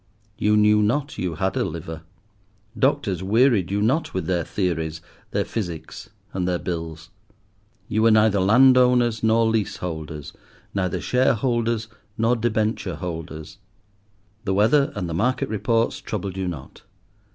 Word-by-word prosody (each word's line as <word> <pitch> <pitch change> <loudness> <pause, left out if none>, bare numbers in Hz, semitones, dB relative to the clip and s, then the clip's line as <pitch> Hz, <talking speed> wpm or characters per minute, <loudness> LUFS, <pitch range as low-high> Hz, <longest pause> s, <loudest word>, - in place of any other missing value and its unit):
You 105 0 +2
knew 105 0 +5
not 135 +7 -1
you 90 -3 -2
had 95 +2 -1
a - - +1
liver. 80 0 -6 0.7
Doctors 130 - +1
wearied 110 -1 +3
you 100 +1 0
not 130 - 0
with 95 -3 -1
their 85 -1 0
theories, 80 -4 -2 0.3
their - - -1
physics, 85 -8 -6 0.2
and 90 -1 -1
their 90 -1 +1
bills. 80 -2 -6 0.8
You 110 - 0
were 115 - +5
neither 110 -2 +4
landowners 125 +2 +5
nor 115 +1 +3
leaseholders, 85 -9 -3 0.4
neither 95 -3 -1
shareholders 120 -2 +1 0.3
nor 115 +2 +2
debenture 110 -1 -1
holders. 80 -3 -7 0.8
The 95 -2 -1
weather 120 +8 +3
and 95 -4 -3
the 85 - -4
market 125 +9 0
reports 115 +2 0
troubled 100 -3 -4
you 95 -1 -2
not. 75 -7 -8
105 Hz, 135 wpm, -23 LUFS, 90-115 Hz, 0.8 s, knew